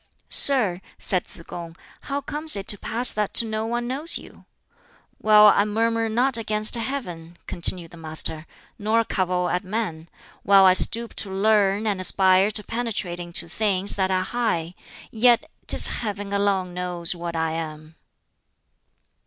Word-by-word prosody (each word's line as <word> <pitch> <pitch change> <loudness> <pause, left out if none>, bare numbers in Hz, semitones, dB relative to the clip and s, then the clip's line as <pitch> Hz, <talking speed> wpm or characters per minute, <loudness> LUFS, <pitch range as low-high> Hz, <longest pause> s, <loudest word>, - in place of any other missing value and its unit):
"Sir," 215 -11 +5 0.2
said 185 -2 -3
Tsz 165 - -1
kung, 170 -1 -9 0.3
"how 280 +1 -2
comes 300 +1 -2
it 200 -1 -6
to 205 - +2
pass 240 +3 0
that 210 -1 +2
no 220 0 -4
one 240 +1 -3
knows 285 +6 0
you?" - - -15 0.7
"While 210 -1 +6
I 200 -1 +5
murmur 225 +2 -1
not 245 +3 +2
against 215 -1 0
Heaven," 180 -10 -3
continued 170 -1 0
the 170 - -13
Master, 160 0 -3 0.3
"nor 220 +2 +1
cavil 180 -4 -2
at 180 - -2
men; 185 -5 -5 0.3
while 195 -1 +5
I 185 - +6
stoop 230 +5 +4
to 195 - -2
learn 205 +1 +1
and 200 -3 -1
aspire 190 +1 +3
to 210 0 0
penetrate 220 -7 -4
into 175 -1 -4
things 200 +1 0
that 190 -1 -1
are 185 -1 0
high; 185 -7 -3 0.4
yet 235 +1 +3 0.2
'tis - - +4
Heaven 205 -2 -3
alone 195 -3 -1
knows 180 -1 -3
what 170 -1 -7
I 160 0 -1
am." 155 -1 -7
200 Hz, 155 wpm, -22 LUFS, 175-225 Hz, 0.7 s, While